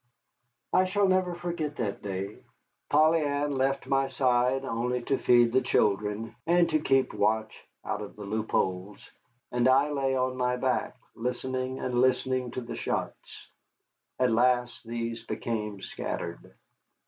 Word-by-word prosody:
I 185 - +5
shall 200 +1 +2
never 185 -2 +2
forget 170 -4 -3
that 105 -6 -3
day. 100 +1 -5 0.5
Polly 155 +2 +4
Ann 145 0 0
left 135 0 0
my 135 0 +1
side 130 0 +1
only 125 +1 -1
to 135 +2 0
feed 120 -1 +5
the 130 - +4
children 105 +2 0
and 175 0 +4
to 155 - +3
keep 135 -3 +2
watch 110 +1 +1 0.3
out 105 - -2
of 105 - -8
the 105 - -9
loopholes, 100 -2 -2 0.4
and 120 0 +2
I 135 +3 +4
lay 135 -2 0
on 130 0 0
my 125 0 +1
back, 130 0 -1 0.2
listening 130 +2 -3
and 125 -2 0
listening 130 0 +1
to 130 - -3
the 120 - -6
shots. - - -4 0.7
At 125 -1 +2
last 120 0 +2
these 115 0 -3
became 105 -4 -4
scattered. 85 0 -5
125 Hz, 145 wpm, -28 LUFS, 115-135 Hz, 0.7 s, I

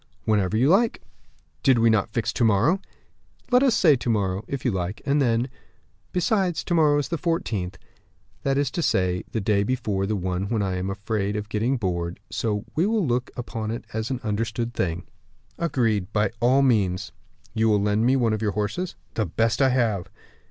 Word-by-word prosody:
"Whenever 105 -1 +1
you 125 +4 +3
like." 210 +8 +3 0.6
"Did 130 -3 +4
we 115 0 +4
not 105 -3 +1
fix 115 -1 -1
to - - 0
morrow?" 115 - +3 0.7
"Let 250 +1 +6
us 265 -5 +4
say 160 -9 +5
to 120 - -4
morrow, 100 -3 0
if 140 -1 -5
you 125 - +3
like; 95 +1 -3
and 140 +1 +2
then, 120 -1 +2 0.6
besides, 185 -2 +1
to 175 - -2
morrow 150 -3 +4
is 145 - -1
the 170 - -2
14th, 110 - -2 0.7
that 135 0 0
is 140 -2 +1
to 170 - -2
say, 90 - +1
the 115 - -1
day 100 -1 +2
before 105 -4 -1
the 105 - 0
one 95 +1 -2
when 110 -3 0
I 95 -1 -1
am 95 +1 -2
afraid 100 +1 -2
of 105 0 -4
getting 115 +5 0
bored; 85 -4 -2
so 105 -2 -2
we 170 +5 +2
will 220 -4 +1
look 125 -1 0
upon 115 -3 -4
it 115 +1 -4
as 110 0 -2
an 130 -2 -2
understood 115 +2 -2
thing." 90 -3 -2 0.6
"Agreed, 115 - 0
by 105 -2 +1
all 130 +3 +4
means." 100 -8 +1 0.4
"You 110 0 +2
will 105 -1 +3
lend 105 +2 +1
me 130 +3 +4
one 120 -4 +2
of 110 - -2
your 105 -2 0
horses?" 105 - -2 0.2
"The 110 -4 -1
best 115 - 0
I 135 - +5
have." 115 -7 0
115 Hz, 195 wpm, -24 LUFS, 100-135 Hz, 0.7 s, Let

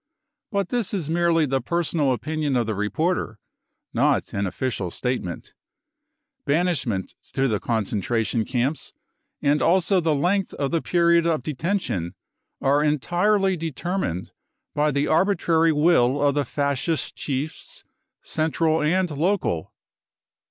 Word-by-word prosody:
But 200 -3 -1
this 235 -4 -1
is 160 -5 -3
merely 170 -1 +3
the 135 -1 0
personal 160 -1 0
opinion 150 +2 -1
of 120 -2 +2
the 110 - -2
reporter, 110 - -1 0.6
not - - +1
an 100 0 -1
official 105 -3 -3
statement. 125 -4 -4 0.9
Banishment 145 - 0 0.2
to 135 0 +2
the 105 -5 0
concentration 115 +1 -1
camps 130 +6 -2 0.5
and 145 +1 +3
also 185 +2 +3
the 160 -3 +1
length 180 +7 0
of 140 -2 -2
the 165 - +1
period 170 -1 +3
of 155 -6 0
detention 140 - -2 0.5
are 145 +2 +3
entirely 180 +7 +2
determined 165 - -3 0.4
by 150 +1 +2
the 140 0 +1
arbitrary 165 -1 +3
will 150 -4 +3
of 145 -1 +3
the 145 0 0
Fascist 140 +4 -1
chiefs, 145 +2 -5 0.4
central 160 0 0
and 180 +3 +1
local. 150 - -1
150 Hz, 125 wpm, -24 LUFS, 130-170 Hz, 0.9 s, merely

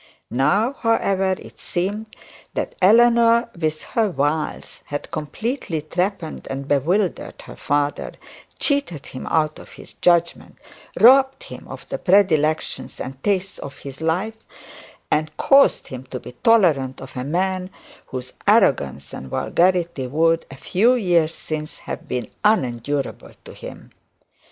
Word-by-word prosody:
Now, 195 - +2
however, 195 -6 +1
it - - -14
seemed 205 +5 -3 0.5
that - - -2
Eleanor, 235 +3 +5
with 155 -2 -2
her 225 -3 +2
wiles, 150 0 -2
had 145 0 -6
completely 165 - -3
trepanned 180 +1 -3
and 135 +1 -5
bewildered 175 +8 0
her - - -11
father, 145 0 -1 0.4
cheated 280 - -1
him 130 - -8
out 155 -2 +1
of - - -13
his - - -13
judgement, 170 -1 +1 0.4
robbed 265 +3 +6
him - - -10
of - - -10
the - - -3
predilections 160 -6 +2
and 130 +1 -7
tastes 195 -1 -1
of 140 - -10 0.2
life, 185 +8 -1 0.7
and 155 0 0
caused 275 0 +4
him 130 -1 -8
to 130 0 -6
be - - -10
tolerant 145 - +3
of 130 0 -11
a 125 - -3
man 185 +5 -1 0.4
whose 130 -1 -7
arrogance 95 - +2
and 65 - -7
vulgarity 170 - +1
would, 165 +4 +2
in - - -34
a 135 - -10
few 230 +7 +3
years 175 -8 +2
since, 155 -1 -6
have - - -7
been 125 -4 -3 0.2
unendurable 140 - 0
to - - -10
him. - - -11
170 Hz, 135 wpm, -21 LUFS, 145-205 Hz, 0.7 s, robbed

